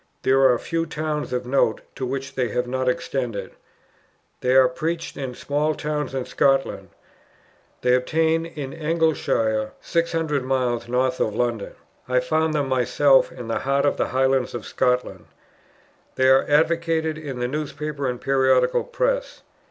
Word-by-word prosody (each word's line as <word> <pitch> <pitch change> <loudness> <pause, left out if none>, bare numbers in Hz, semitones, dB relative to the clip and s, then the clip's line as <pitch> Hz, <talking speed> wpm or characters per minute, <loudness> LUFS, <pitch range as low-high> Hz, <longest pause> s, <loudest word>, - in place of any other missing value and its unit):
There 135 0 +5
are 125 - +3
few 165 +5 -2
towns 155 -1 -3
of 125 0 -2
note, 125 -3 +1
to 130 -2 -4
which 135 +1 -4
they 125 -2 0
have 125 +3 -1
not 130 +1 -1
extended. 120 -7 -3 0.9
They 125 +1 +1
are 130 -1 +7
preached 165 +6 -3
in 130 -3 -5
small 150 +2 -1
towns 150 -3 -3
in 130 -2 -2
Scotland. 135 -1 +1 0.9
They 125 0 +4
obtain 160 +6 +1
in 145 -5 -7
Elginshire, 150 -9 0
600 165 -4 -1
miles 125 -3 -1
north 130 +1 0
of 105 - 0
London. 120 -3 -2 0.3
I 125 0 +3
found 155 +5 0
them 145 -2 0
myself 130 +2 +3
in 125 -2 -8
the 115 - -1
heart 140 +1 +1
of 145 - +1
the - - 0
highlands 130 -1 +1
of - - -6
Scotland. 125 0 -1 0.9
They 130 0 +3
are 135 0 +5
advocated 160 +1 +1
in 140 -4 -6
the 125 0 -1
newspaper 150 0 -4
and 125 -1 -4
periodical 130 -2 +2
press. - - -2
135 Hz, 150 wpm, -23 LUFS, 125-155 Hz, 0.9 s, are